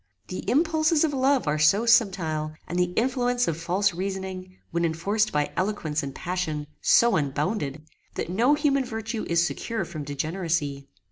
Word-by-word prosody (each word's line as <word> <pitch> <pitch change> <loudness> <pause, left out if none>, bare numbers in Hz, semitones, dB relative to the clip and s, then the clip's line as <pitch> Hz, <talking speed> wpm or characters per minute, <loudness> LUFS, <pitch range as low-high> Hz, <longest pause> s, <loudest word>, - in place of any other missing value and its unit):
The 185 - -4
impulses 315 +1 +3
of 310 -3 +1
love 265 - +2
are 150 +1 +1
so 195 +10 +4
subtile, 175 -10 +2
and 175 +2 -2
the 180 0 +1
influence 245 0 +1
of 165 - 0
false 180 +4 0
reasoning, 190 0 -5
when 170 +1 0
enforced 195 +7 0
by 150 -1 0
eloquence 175 -6 -1
and 140 -2 -6
passion, 170 -4 -3 0.2
so 235 -1 +5
unbounded, 150 +1 -2 0.3
that - - -3
no 235 - +3
human 275 -2 +2
virtue 225 -2 -4
is 170 0 +3
secure 225 +2 -3
from 155 -3 -6
degeneracy. 145 -1 -2
185 Hz, 155 wpm, -26 LUFS, 155-230 Hz, 0.3 s, so